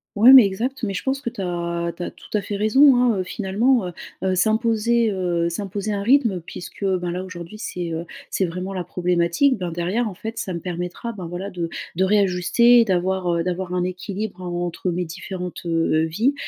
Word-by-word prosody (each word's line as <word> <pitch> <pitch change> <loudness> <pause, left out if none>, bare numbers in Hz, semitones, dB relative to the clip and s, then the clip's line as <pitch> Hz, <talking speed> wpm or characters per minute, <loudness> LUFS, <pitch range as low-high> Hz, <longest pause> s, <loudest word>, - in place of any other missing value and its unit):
Ouais, 225 +5 +8
mais 260 -4 +10
exact. 235 +7 -3
Mais 200 - -1
je 185 - -4
pense 270 +1 0
que 270 - -3
tu 205 - -7
as 170 -1 -2
tu - - -8
as - - -3
tout - - -17
à - - -1
fait 200 +1 -5
raison, 255 +7 +5
hein 245 -3 +3
heu, 185 - 0
finalement. 210 +4 +1
Heu - - -5 0.3
heu, 190 0 +1
s'imposer, 225 +2 +2
heu 175 -3 0
s'imposer 200 +3 -4
un 200 -1 -2
rythme, 235 -5 +3
puisque 180 +3 -8
ben 180 -2 0
là 180 +1 -3
aujourd'hui 185 +1 -8
c'est, 175 -6 -4
heu, 165 +1 -4 0.2
c'est 190 - 0
vraiment 180 +3 -5
la 180 -2 -4
problématique, 180 +9 +1
ben 180 -3 -4
derrière, 185 +8 -1
en 205 - -5
fait, 225 +5 -7
ça 190 -6 -3
me 170 - -4
permettra 180 +6 -4
ben 190 -5 -8
voilà 180 +4 -5
de 175 -3 -3 0.3
de 190 - +3
réajuster, 210 +5 +4
d'avoir, 185 -1 0
heu, 170 - 0
d'avoir 180 0 -3
un 180 -1 0
équilibre 190 +2 -4
en 175 -1 -3
entre 175 +1 -3
mes 180 +1 -1
différentes, 180 +1 -7
heu, 165 -1 +1
vies. 220 - +1
190 Hz, 210 wpm, -22 LUFS, 175-220 Hz, 0.3 s, mais